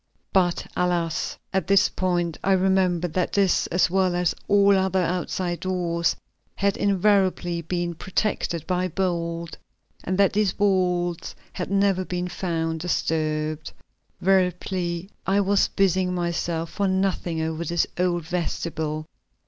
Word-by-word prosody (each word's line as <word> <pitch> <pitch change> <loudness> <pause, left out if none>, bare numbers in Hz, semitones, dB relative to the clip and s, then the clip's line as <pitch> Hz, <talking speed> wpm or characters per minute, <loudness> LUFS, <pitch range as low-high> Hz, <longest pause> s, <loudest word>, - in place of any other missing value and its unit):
But 180 -3 +2
alas! 175 -2 0 0.2
at 190 -4 0
this 195 -1 +5
point 175 -3 -1
I 195 - +3
remembered 185 -3 +2
that 180 +1 0
this, 195 -3 +2
as 180 +1 +2
well 185 0 +1
as 175 -1 +1
all 200 0 +5
other 190 -1 +1
outside 180 0 -2
doors, 170 -2 0 0.4
had 200 0 +1
invariably 190 -3 +2
been 175 +1 -2
protected 175 -2 -2
by 180 0 0
bolt, 170 -2 -2 0.5
and 185 +1 -1
that 200 -1 +4
these 205 -2 +2
bolts 180 -4 0 0.2
had 180 - -4
never 195 -1 +2
been 180 0 -3
found 165 -3 -2
disturbed. 155 -2 -1 0.5
Veritably 180 -1 0 0.2
I 195 +1 +3
was 200 0 +3
busying 185 -1 +1
myself 170 -1 -2
for 200 -1 0
nothing 190 -3 0
over 160 +1 -2
this 170 -1 +1
old 175 -2 +1
vestibule. 160 -3 -3
180 Hz, 130 wpm, -24 LUFS, 170-190 Hz, 0.5 s, this